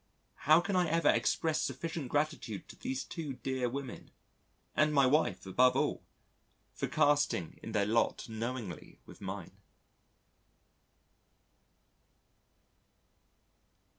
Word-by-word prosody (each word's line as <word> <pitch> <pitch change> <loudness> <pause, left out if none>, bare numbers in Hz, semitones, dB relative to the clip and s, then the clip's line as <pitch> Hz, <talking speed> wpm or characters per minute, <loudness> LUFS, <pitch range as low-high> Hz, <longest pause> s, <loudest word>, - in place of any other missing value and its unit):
How 155 +2 +8
can 190 +2 -2
I 180 -2 +3
ever 165 -1 +3
express 160 -2 +2
sufficient 140 +1 -3
gratitude 145 - -2
to - - -10
these 130 0 -3
two 155 -5 -5
dear 130 -1 -2
women 135 0 -6 0.7
(and 155 0 +3
my 140 -1 +6
wife, 150 -2 +2
above 125 +7 +4
all) - - 0 0.7
for - - -3
casting 145 - +1
in - - -7
their 100 -1 +2
lot 115 +3 +1
knowingly 115 -4 -5
with - - -14
mine? 95 -2 -6
135 Hz, 105 wpm, -32 LUFS, 115-155 Hz, 0.7 s, How